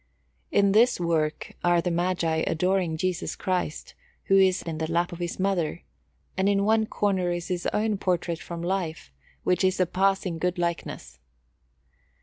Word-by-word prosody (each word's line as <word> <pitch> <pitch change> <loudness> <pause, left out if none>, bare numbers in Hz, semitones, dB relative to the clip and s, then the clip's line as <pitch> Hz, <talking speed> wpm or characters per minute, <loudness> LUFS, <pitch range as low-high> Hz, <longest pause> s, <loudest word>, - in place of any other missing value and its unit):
In 200 -1 +4
this 230 +3 +4
work 160 -3 -1
are 175 0 +4
the 175 +1 -1
Magi 170 -2 0
adoring 180 0 +1
Jesus 180 +1 -2
Christ, 185 -5 -3 0.3
who 195 - +3
is 190 -1 +4
in 160 -2 -5
the 160 0 -2
lap 170 +1 +1
of 175 - -8
His 175 0 -4
Mother, 185 - 0 0.5
and 190 +1 +2
in 200 0 +2
one 220 0 +3
corner 190 -5 0
is 175 0 -4
his 180 -1 -1
own 215 -1 0
portrait 175 -3 -1
from 170 -1 -7
life, 175 - -3 0.3
which 180 +1 +1
is 185 0 +2
a 185 - +4
passing 190 -1 0
good 180 +1 0
likeness. 170 - -4
180 Hz, 160 wpm, -26 LUFS, 170-195 Hz, 0.5 s, In